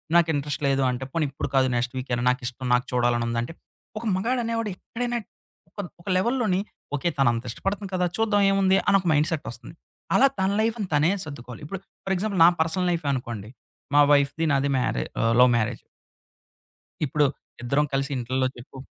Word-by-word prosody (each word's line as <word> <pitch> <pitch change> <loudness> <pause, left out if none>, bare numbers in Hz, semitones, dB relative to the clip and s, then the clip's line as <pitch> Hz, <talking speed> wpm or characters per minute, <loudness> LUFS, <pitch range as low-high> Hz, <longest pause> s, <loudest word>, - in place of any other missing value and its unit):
నాకు 170 -1 +5
ఇంట్రెస్ట్ 145 0 -3
లేదు 135 0 +2
అంటే, 125 +1 -4
పోని 165 -2 +1
ఇప్పుడు 140 - -4
కాదు 130 -1 +4
నెక్స్ట్ 120 +1 -1
వీకైనా 125 -1 -2
నాకు 125 +2 0
ఇష్టం 130 +1 -5
నాకు 125 +1 +2
చూడాలని 120 -1 +2
ఉందంటే, 115 +6 -2 0.5
ఒక - - -10
మగాడ 235 +7 0
అనేవాడు 230 -2 -1
ఎక్కడైనా 240 +4 -3 0.5
ఒక - - -14 0.2
ఒక 190 - -8
లెవెల్‌లోని 220 -3 +1 0.4
ఓకే, 170 +5 0
తను 135 -2 +4
అంత 115 - -3
ఇష్టపడుతుంది 195 - -3
కదా! 180 - +1
చూద్దాం 215 -2 +2
ఏముంది 195 -1 +3
అని 200 -1 +6
ఒక - - -17
మైండ్ 150 +1 +3
సెట్ 155 -2 -2
వస్తుంది. 120 +7 -11 0.4
అలా 275 - +7
తన 190 +1 +2
లైఫ్‌ని 220 -3 -1
తనే 150 +5 +4
సర్దుకోవాలి. 125 -4 -9
ఇప్పుడు 190 +6 -5 0.3
ఫర్ 195 - 0
ఎగ్జాంపుల్ 200 0 -1
నా - - +9
పర్సనల్ 180 +3 0
లైఫే 165 -4 -2
అనుకోండి. 115 -5 -5 0.5
మా 145 - +8
వైఫ్‌ది 140 +3 +2
నాది 140 +1 +1
మ్యారే 125 - 0 0.2
ఆహ్, 115 0 +3
లవ్ 125 0 +7
మ్యారేజ్. 115 +1 -1 1.2
ఇప్పుడు 150 +1 +2 0.4
ఇద్దరం 140 +5 +2
కలిసి 135 +1 0
ఇంట్లల్లో 130 +2 0
చెప్పు 125 +2 -12
145 Hz, 180 wpm, -25 LUFS, 125-190 Hz, 1.2 s, నా